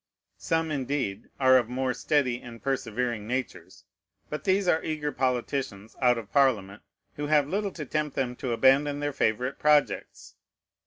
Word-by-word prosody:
Some, 160 -1 0
indeed, 130 -7 -2
are 130 -1 +6
of 120 -2 -4
more 130 0 -1
steady 125 -2 0
and 115 -1 -10
persevering 120 -4 -2
natures; 125 +2 -5 0.5
but 150 - -5
these 195 0 +2
are 160 -2 +2
eager 150 -2 -2
politicians 125 -4 -2
out 125 -1 +4
of 115 -3 -8
Parliament, 110 -8 +2 0.4
who 145 0 -3
have 150 -2 +3
little 200 +5 -1
to 150 - -6
tempt 150 0 -2
them 125 -2 -1
to 125 - -3
abandon 140 +4 +3
their 145 0 -2
favorite 125 +1 0
projects. 150 -1 +1
130 Hz, 155 wpm, -27 LUFS, 120-150 Hz, 0.5 s, are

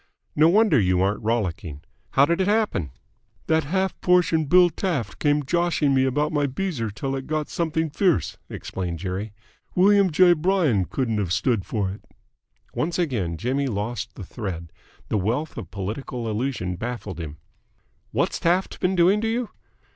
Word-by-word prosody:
"No 155 +2 +5
wonder 200 - +4
you 90 -3 +2
aren't 100 +2 +1
rollicking. 90 -9 -2 0.3
How 140 - +6
did 170 +4 +1
it 190 - +1
happen?" 210 - +1 0.6
"That 160 -1 +2
half 190 +5 -1
portion 175 -3 +3
Bill 175 +3 +5
Taft 155 - -3
came 145 0 +2
joshing 170 -2 +1
me 130 0 +3
about 145 +4 0
my 145 -1 +2
beezer 140 - -2
till 135 +6 -3
it 135 -1 -5
got 155 -1 -2
something 160 -2 -1
fierce," 180 +2 +1
explained 90 -3 -5
Jerry. 95 +4 -4 0.4
"William 200 +1 +5
J. 175 +3 +6
Bryan 160 - +2
couldn't 115 -3 -1
have 95 -5 -2
stood 105 0 +1
for 100 -4 -1
it." 100 - -10 0.7
Once 170 +2 -1
again 110 - -1
Jimmy 135 - -1
lost 110 0 -3
the - - -8
thread. 85 -5 -6 0.4
The 105 - +1
wealth 120 +11 -1
of 85 - -7
political 115 +5 -5
allusion 105 -5 -2
baffled 115 -4 -5
him. 75 -2 -6 0.7
"What's - - 0
Taft 180 +3 +1
been 185 +1 +1
doing 185 +4 +4
to 225 - 0
you?" 230 +1 -1
135 Hz, 160 wpm, -24 LUFS, 105-170 Hz, 0.7 s, How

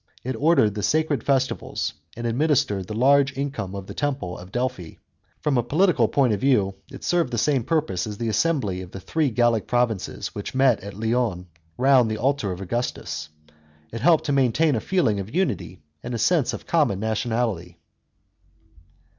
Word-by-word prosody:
It 130 +1 -3
ordered 145 -9 +3
the 105 - -4
sacred 155 -1 +1
festivals 135 -1 -1 0.2
and 120 - -5
administered 115 - +1
the 105 - -5
large 135 +3 +3
income 135 -9 -3
of 100 -1 -6
the - - -8
temple 135 -12 -2
of 90 +1 -11
Delphi. 120 -9 -3 0.5
From 140 -4 +1
a - - +1
political 150 - +3
point 130 -3 +2
of 100 - -1
view, 105 -8 +2 0.2
it - - -10
served 170 -7 +1
the 120 - -2
same 135 +1 +2
purpose 130 - -1
as 105 -1 -6
the 115 - -3
assembly 110 - 0
of 90 - -9
the 95 - -8
three 155 - 0
Gallic 120 -2 +1
provinces 120 -5 -1
which 100 +5 -6
met 130 -4 +4
at 100 0 -9
Lyons 110 -5 0 0.3
round 130 -3 +4
the 110 - -2
altar 130 -5 0
of 90 +1 -6
Augustus; 95 -6 -3 0.6
it 115 - -5
helped 165 +3 +4
to 145 - -2
maintain 140 +3 +3
a 110 - -1
feeling 165 - +1
of 100 +8 -7
unity 175 - -2 0.2
and 120 0 -5
a - - -1
sense 150 +4 +2
of - - -7
common 145 - +1
nationality. 110 -5 -2
120 Hz, 180 wpm, -24 LUFS, 105-140 Hz, 0.6 s, met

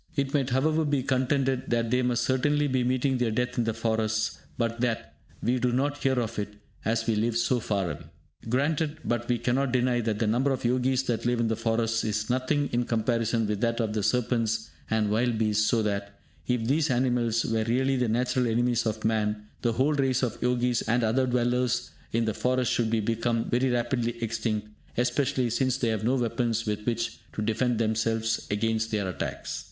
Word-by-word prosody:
It 140 -1 -1
might, 135 -3 +1
however, 155 +5 +2
be 145 -3 0
contended 130 0 0
that 115 -1 0
they 125 0 +3
must 120 -1 +1
certainly 145 +3 +2
be 130 -3 +1
meeting 130 +1 +1
their 120 -2 +1
death 125 +3 -1
in 120 - +2
the 115 - 0
forests, 110 -1 0 0.2
but 115 0 -1
that 115 -11 -1 0.3
we 125 +2 +1
do 125 0 +1
not 145 +4 0
hear 130 -2 +1
of 115 -2 -3
it, 105 0 -4 0.3
as 115 0 0
we 115 - +2
live 115 +2 +1
so 125 +1 +2
far 100 -5 -1
away. 75 - -8 0.4
Granted; 145 +4 0
but 120 0 -1
we 120 - +2
cannot 125 +2 0
deny 125 -1 +2
that 110 -2 -1
the 115 - 0
number 120 +6 +2
of 130 -3 -2
Yogis 130 +2 +2
that 120 -2 -1
live 120 -1 +1
in 115 -1 +1
the 110 - +1
forests 115 0 0
is 110 +2 -1
nothing 135 +3 +1
in 120 0 +1
comparison 115 0 0
with 105 0 -2
that 115 0 +1
of 110 -2 0
the 110 - 0
serpents 115 0 0 0.2
and 110 -2 +1
wild 115 +1 +1
beasts, 105 -1 +2
so 115 -2 +2
that, 100 -1 -3 0.3
if 125 -2 0
these 145 +5 +2
animals 120 -3 +1
were 115 -1 0
really 130 +4 +1
the 125 -3 +1
natural 125 +2 +1
enemies 120 0 +1
of 110 0 -3
man, 105 -1 0 0.2
the 120 -1 +1
whole 135 +6 +2
race 135 -3 +1
of 120 -2 0
Yogis 125 -1 +1
and 115 +2 +1
other 125 +4 +2
dwellers 125 -1 0 0.2
in 115 0 +1
the 110 - 0
forests 125 +2 +1
should 115 -2 +1
become 115 +1 0
very 125 +2 +2
rapidly 120 -1 0
extinct, 110 -1 -2 0.3
especially 125 0 +1
since 130 +2 +1
they 120 - 0
have 110 -1 -1
no 125 +4 +2
weapons 115 -2 0
with 105 -1 -2
which 115 0 -1
to 105 - -3
defend 115 +2 +1
themselves 115 0 0
against 110 +2 0
their 105 -3 -1
attacks. 90 - -4
120 Hz, 200 wpm, -27 LUFS, 110-125 Hz, 0.4 s, they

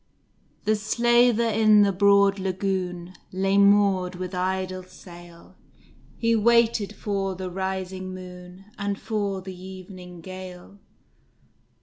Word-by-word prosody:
The 215 +1 +2
Slaver 235 +2 +3
in 215 -1 +5
the 200 - +2
broad 200 +1 +4
lagoon 185 -2 -3 0.2
Lay 195 +1 +1
moored 200 -2 +3
with 185 +1 -6
idle 185 0 -2
sail; 175 -2 -15 0.6
He 230 0 +2
waited 225 -2 +2
for 195 -2 -2
the 185 0 -6
rising 190 0 -4
moon, 180 +1 -11
And 200 0 -2
for 200 -4 -3
the 190 -1 -8
evening 185 -1 -11
gale. 185 +1 -10
190 Hz, 110 wpm, -25 LUFS, 185-205 Hz, 0.6 s, in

